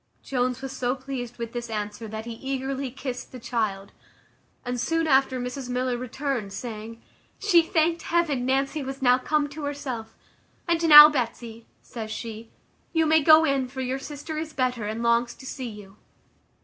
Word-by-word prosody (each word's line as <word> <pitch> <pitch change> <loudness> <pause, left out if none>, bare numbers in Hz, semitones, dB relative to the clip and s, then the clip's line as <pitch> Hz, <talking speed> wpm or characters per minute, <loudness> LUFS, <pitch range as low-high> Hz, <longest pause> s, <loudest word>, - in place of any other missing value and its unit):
Jones 255 0 -1
was 270 - -4
so 250 0 -1
pleased 255 -2 -6
with 235 -1 -6
this 240 -1 -5
answer, 210 +1 -4
that 220 +1 -6
he 235 - -6
eagerly 270 +2 -3
kissed 255 0 -6
the 255 - -9
child; 215 -5 -2 0.7
and 245 -1 -2
soon 330 +4 0
after 265 -3 +3
Mrs 250 +1 -5
Miller 250 0 -1
returned, 250 -3 -3
saying, 230 0 -7 0.4
"She 370 -5 +4
thanked 330 0 +1
heaven 320 -7 0
Nancy 270 +3 0
was 270 0 -6
now 250 0 +5
come 300 +2 0
to 290 +1 -6
herself. 255 -6 -5 0.5
And 335 -1 +1
now, 295 0 +13
Betsy," 235 -5 -4 0.2
says 225 -2 -7
she, 225 0 -7 0.4
"you 325 -1 +3
may 315 0 +4
go 315 +2 +7
in, 275 -3 +1
for 260 +1 -6
your 260 +1 -2
sister 295 +2 -6
is 315 -1 -6
better, 250 -4 -1
and 220 +2 -4
longs 235 +1 +2
to 265 - -13
see 260 -2 -5
you." 210 -2 -12
255 Hz, 175 wpm, -25 LUFS, 235-285 Hz, 0.7 s, now